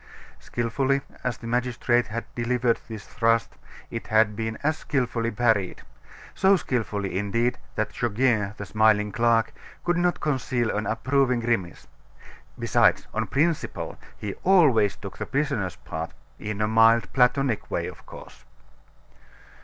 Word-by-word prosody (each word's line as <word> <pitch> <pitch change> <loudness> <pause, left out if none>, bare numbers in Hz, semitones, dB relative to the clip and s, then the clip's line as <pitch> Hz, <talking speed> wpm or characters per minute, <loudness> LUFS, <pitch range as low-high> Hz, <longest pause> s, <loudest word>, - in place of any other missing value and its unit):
Skilfully 135 +4 -1 0.2
as 125 -1 -2
the - - -11
magistrate 120 0 +1
had 115 +2 -4
delivered 120 0 +1
this 110 -3 -8
thrust, 115 0 +1 0.4
it 115 - -5
had 110 -1 +3
been 110 +1 -3
as 155 +1 +1
skilfully 120 -4 -1
parried; 110 -5 0 0.5
so 195 +1 +4
skilfully, 105 - -2
indeed, 115 +5 0 0.2
that 110 - -2
Goguet, 110 -3 0
the 105 - -6
smiling 105 0 +3
clerk, 115 0 +2 0.3
could 175 0 +1
not 175 0 +1
conceal 130 -6 -1
an 105 +1 -2
approving 125 +2 +1
grimace. 115 -8 -2 0.7
Besides, - - +3
on - - -1
principle, 155 +3 -1 0.2
he 105 -2 -4
always 145 - +4
took 100 - -10
the - - -4
prisoner's 135 - -1
part, 80 +1 -6 0.3
in 105 0 -4
a 105 - +2
mild, 115 -2 +4
Platonic 130 -2 +2
way, - - -1
of - - -9
course. - - -12
115 Hz, 135 wpm, -25 LUFS, 105-125 Hz, 0.7 s, so